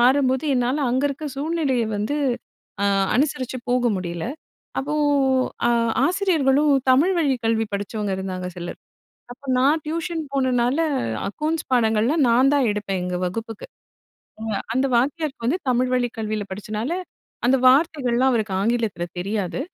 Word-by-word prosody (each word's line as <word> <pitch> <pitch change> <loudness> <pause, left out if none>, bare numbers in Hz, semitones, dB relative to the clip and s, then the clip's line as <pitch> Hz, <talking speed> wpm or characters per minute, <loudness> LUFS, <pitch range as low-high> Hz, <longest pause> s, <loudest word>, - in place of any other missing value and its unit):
மாறும்போது 260 +2 +3
என்னால 255 +4 +1
அங்க 255 +2 +1
இருக்க 285 +2 -5
சூழ்நிலயை 280 -5 0
வந்து 210 +8 -1 0.7
அ - - +2 0.3
அனுசரிச்சு 260 -2 0
போக 245 0 +2
முடியல. 175 -2 -4 0.6
அப்போ 290 +3 -3 0.7
ஆ - - +3 0.4
ஆசிரியர்களும் 305 -6 +2 0.2
தமிழ் 305 +9 +4
வழிக் 270 -7 +1
கல்வி 225 0 +2
படிச்சவங்க 205 +1 -3
இருந்தாங்க 185 -1 -4
சிலர் 175 0 -6 0.5
அப்ப 250 +3 -13
நான் 285 +5 +3
டியூஷன் 330 +1 -2
போனனால 255 -1 +1 0.5
அக்கௌண்ட்ஸ் 305 +9 -2
பாடங்கள்லாம் 235 +5 +3
நான் 250 +4 +5
தான் 280 -3 +3
எடுப்பேன் 205 -2 -2
எங்க 180 0 -2
வகுப்புக்கு. 225 +4 -5 0.8
அ - - -6 0.3
அந்த 260 +1 +2
வாத்தியாருக்கு 280 +1 -1
வந்து 305 +9 +1
தமிழ் 250 +1 +1
வழிக் 245 -2 -1
கல்வியில 215 -1 -2
படிச்சனால 215 - -4 0.5
அந்த 260 +2 +5
வார்த்தைகள்லாம் 265 -3 +3
அவருக்கு 220 -5 -1
ஆங்கிலத்தில 225 -6 0 0.2
தெரியாது. 200 +3 -2
250 Hz, 130 wpm, -23 LUFS, 215-285 Hz, 0.8 s, நான்